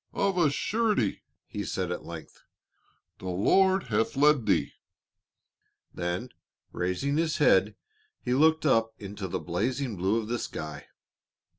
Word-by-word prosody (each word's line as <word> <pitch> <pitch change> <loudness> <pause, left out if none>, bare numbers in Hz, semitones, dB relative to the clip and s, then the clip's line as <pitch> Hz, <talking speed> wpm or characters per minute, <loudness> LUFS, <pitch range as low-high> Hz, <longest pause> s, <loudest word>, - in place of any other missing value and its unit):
"Of 200 -1 +1
a 170 -4 +4
surety," 210 - 0 0.2
he 105 - -5
said 90 -1 -2
at 90 - -4
length, 85 -2 -10 0.8
"the 95 - -5
Lord 190 - +3
hath 110 +3 0
led 145 -4 +4
thee." - - +2 1.2
Then 90 +7 -3 0.4
raising 90 +12 -1
his 160 -1 +1
head - - +4 0.4
he 125 - -2
looked 160 +3 +4
up 115 -5 +2
into 100 -1 -6
the - - -2
dazzling 120 +5 -2
blue 95 +6 +1
of 110 - -5
the 120 +1 -2
sky. 75 -6 -6
115 Hz, 135 wpm, -28 LUFS, 95-150 Hz, 1.2 s, a